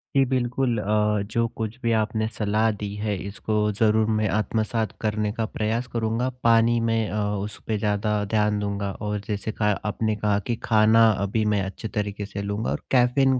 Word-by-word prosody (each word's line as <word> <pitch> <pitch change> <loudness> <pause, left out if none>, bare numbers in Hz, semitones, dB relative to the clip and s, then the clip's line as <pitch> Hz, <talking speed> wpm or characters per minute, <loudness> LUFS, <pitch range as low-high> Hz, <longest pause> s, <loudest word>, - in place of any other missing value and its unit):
जी, 135 - +6
बिल्कुल 125 -1 0
अ, 105 0 +1
जो 115 0 +1
कुछ 110 +1 -4
भी 115 - +2
आपने 110 0 -1
सलाह 110 +1 +2
दी 100 -1 -5
है, 105 -1 0
इसको 105 +2 -3 0.2
ज़रूर 110 +1 +3
मैं 110 - +1
आत्मसात 110 0 -1
करने 105 -1 0
का 115 -1 -1
प्रयास 115 +3 -2
करूँगा। 115 +2 0
पानी 115 0 +4
में 115 -1 +1
अ, 105 - -2 0.2
उस 105 0 -6
पे 110 - 0
ज़्यादा 105 0 0
ध्यान 105 -1 +2
दूँगा, 100 -1 -2
और 105 +1 -3
जैसे 105 +1 -2
कहा 105 -1 +1
आपने 110 +1 0
कहा 105 -1 +1
कि 120 - 0
खाना 110 0 +5
अभी 105 +2 0
मैं 100 - +1
अच्छे 100 +3 -6
तरीके 105 -1 -3
से 100 0 -6
लूँगा 100 +2 -2
और - - -2
कैफीन 130 +1 +4
110 Hz, 185 wpm, -24 LUFS, 105-115 Hz, 0.2 s, जी